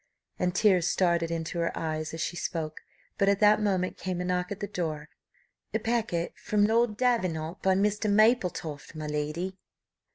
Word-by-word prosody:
And 180 Hz, 0 st, 0 dB
tears 190 Hz, -4 st, +4 dB
started 170 Hz, -3 st, +2 dB
into 165 Hz, +1 st, -3 dB
her 170 Hz, -, +1 dB
eyes 155 Hz, -1 st, -3 dB
as 160 Hz, -, -5 dB
she -, -, -2 dB
spoke; 160 Hz, -3 st, -4 dB, 0.4 s
but 195 Hz, -, +4 dB
at 200 Hz, 0 st, +2 dB
that 210 Hz, 0 st, +5 dB
moment 190 Hz, -3 st, 0 dB
came 185 Hz, -2 st, -3 dB
a 180 Hz, -, -2 dB
knock 180 Hz, 0 st, -1 dB
at 200 Hz, -, -4 dB
the 205 Hz, -, -2 dB
door. 160 Hz, -6 st, -4 dB, 0.7 s
"A -, -, +3 dB
packet 220 Hz, -8 st, -1 dB
from 205 Hz, -1 st, +2 dB
Lord 225 Hz, 0 st, +2 dB
Davenant, 185 Hz, -9 st, 0 dB
by 190 Hz, 0 st, +3 dB
Mr. 210 Hz, +2 st, +1 dB
Mapletofft, 190 Hz, -, +1 dB
my 155 Hz, -1 st, -5 dB
lady." 155 Hz, +6 st, -3 dB
180 Hz, 170 wpm, -28 LUFS, 165-205 Hz, 0.7 s, that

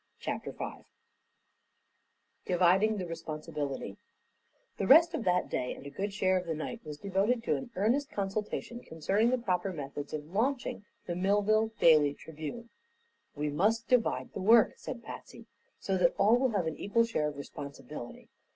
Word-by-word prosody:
CHAPTER -, -, -4 dB
V -, -, -7 dB, 1.6 s
DIVIDING 185 Hz, +4 st, +3 dB
THE 185 Hz, -, -3 dB
RESPONSIBILITY 150 Hz, -, -5 dB, 0.8 s
The 195 Hz, -, -1 dB
rest 330 Hz, +5 st, +7 dB
of 255 Hz, -, -3 dB
that 180 Hz, 0 st, +2 dB
day 125 Hz, -, -2 dB
and -, -, -12 dB
a 140 Hz, -, -7 dB
good 200 Hz, +7 st, -3 dB
share 185 Hz, -1 st, +2 dB
of 180 Hz, -, -8 dB
the 165 Hz, -, -1 dB
night 190 Hz, +9 st, -5 dB
was 150 Hz, -1 st, -7 dB
devoted 200 Hz, +6 st, 0 dB
to -, -, +1 dB
an 260 Hz, -, -5 dB
earnest 240 Hz, +9 st, +1 dB
consultation 210 Hz, +4 st, -3 dB
concerning 200 Hz, +4 st, 0 dB
the 255 Hz, -, +2 dB
proper 190 Hz, -5 st, -1 dB
methods 145 Hz, -3 st, -6 dB
of 150 Hz, -1 st, -4 dB
launching 245 Hz, 0 st, -1 dB, 0.2 s
the 175 Hz, -, -3 dB
Millville 205 Hz, +4 st, +2 dB
Daily 150 Hz, -3 st, +5 dB
Tribune. 160 Hz, +10 st, -8 dB, 0.6 s
"We 150 Hz, +1 st, -1 dB
must 220 Hz, +9 st, +1 dB
divide 250 Hz, -3 st, +1 dB
the 195 Hz, -, -4 dB
work," 225 Hz, +3 st, +6 dB
said 235 Hz, -2 st, -7 dB
Patsy, -, -, -10 dB, 0.3 s
"so 190 Hz, -1 st, -1 dB
that 175 Hz, -1 st, +3 dB
all 210 Hz, +4 st, +5 dB
will 260 Hz, +1 st, +2 dB
have 200 Hz, -7 st, 0 dB
an 160 Hz, -, -3 dB
equal 230 Hz, +4 st, +2 dB
share 210 Hz, -10 st, 0 dB
of 150 Hz, -1 st, -5 dB
responsibility. 140 Hz, -2 st, -8 dB
195 Hz, 160 wpm, -31 LUFS, 155-225 Hz, 1.6 s, rest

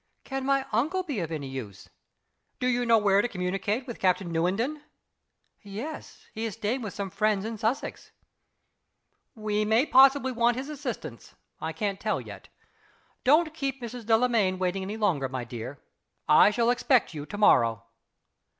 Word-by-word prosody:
"Can 270 Hz, 0 st, -4 dB
my 275 Hz, -1 st, +2 dB
uncle 310 Hz, -, 0 dB
be 290 Hz, -, -3 dB
of 165 Hz, -2 st, -4 dB
any 150 Hz, -4 st, -4 dB
use?" 120 Hz, -8 st, -8 dB, 0.7 s
"Do -, -, -2 dB
you 245 Hz, -1 st, +1 dB
know 230 Hz, -1 st, +6 dB
where 200 Hz, -2 st, +4 dB
to 245 Hz, -, -1 dB
communicate 195 Hz, +4 st, -2 dB
with 240 Hz, -4 st, -8 dB
Captain 185 Hz, -1 st, +1 dB
Newenden?" 210 Hz, -, 0 dB, 0.8 s
"Yes 220 Hz, +10 st, -8 dB
he 220 Hz, -, -5 dB
is 225 Hz, -3 st, -3 dB
staying 225 Hz, +4 st, -2 dB
with 205 Hz, -5 st, -6 dB
some 200 Hz, -2 st, -4 dB
friends 215 Hz, -1 st, +1 dB
in 225 Hz, -1 st, -5 dB
Sussex." 225 Hz, +5 st, -3 dB, 1.2 s
"We 215 Hz, -1 st, -1 dB
may 220 Hz, +5 st, +3 dB
possibly 270 Hz, -1 st, +5 dB
want 235 Hz, 0 st, +2 dB
his 270 Hz, +3 st, -5 dB
assistance. 240 Hz, -, -7 dB, 0.2 s
I 160 Hz, -, -3 dB
can't 200 Hz, +2 st, -3 dB
tell 215 Hz, 0 st, -1 dB
yet. -, -, -10 dB, 0.8 s
Don't 310 Hz, +4 st, +4 dB
keep 275 Hz, -3 st, -3 dB
Mrs. 235 Hz, -2 st, -8 dB
Delamayn 225 Hz, -5 st, +3 dB
waiting 185 Hz, +1 st, -1 dB
any 200 Hz, +3 st, -5 dB
longer, 160 Hz, -11 st, 0 dB
my 130 Hz, -1 st, -4 dB
dear. 120 Hz, +3 st, -7 dB, 0.5 s
I -, -, +7 dB
shall 235 Hz, +2 st, +2 dB
expect 245 Hz, -4 st, +2 dB
you 150 Hz, -1 st, -7 dB
to 205 Hz, -, -7 dB
morrow." 115 Hz, -, +4 dB
215 Hz, 160 wpm, -27 LUFS, 185-250 Hz, 1.2 s, I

